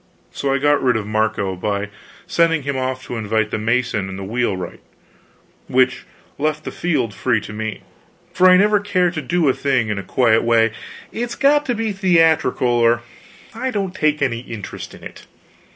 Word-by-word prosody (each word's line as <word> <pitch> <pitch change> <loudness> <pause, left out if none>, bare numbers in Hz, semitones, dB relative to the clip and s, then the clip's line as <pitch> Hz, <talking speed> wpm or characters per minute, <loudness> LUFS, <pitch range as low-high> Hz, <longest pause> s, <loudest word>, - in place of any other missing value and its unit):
So 140 - -2
I 135 - +2
got 145 +1 +2
rid 125 -3 +2
of 105 - -4
Marco, 105 -3 -1
by 100 +2 -2 0.4
sending 165 -3 +2
him 140 0 -2
off 130 0 -2
to 120 - -5
invite 110 0 -1
the - - -2
mason 115 -3 0
and 95 - -6
the 95 - -6
wheelwright, 100 -4 -2 0.9
which 130 0 +2 0.3
left 155 +1 -1
the - - -5
field 135 -11 -1
free 110 +3 +1
to 105 - -9
me. 110 0 -5 0.5
For 185 0 +5
I 185 - +7
never 210 +2 +4
care 185 -3 +1
to 160 -3 -4
do 175 -1 0
a 130 - +4
thing 130 -6 0
in 105 -2 -2
a - - -3
quiet 115 +2 +3
way; 115 -1 +3 0.4
it's 240 +1 -4
got 290 +1 +3
to 245 - 0
be 225 -1 -1
theatrical 165 -9 +2
or 120 -1 +3 0.5
I 250 +3 -3
don't 195 -6 -2
take 150 -5 +1
any 115 -4 0
interest 115 -4 -8
in - - -16
it. - - -11
130 Hz, 185 wpm, -20 LUFS, 110-170 Hz, 0.9 s, I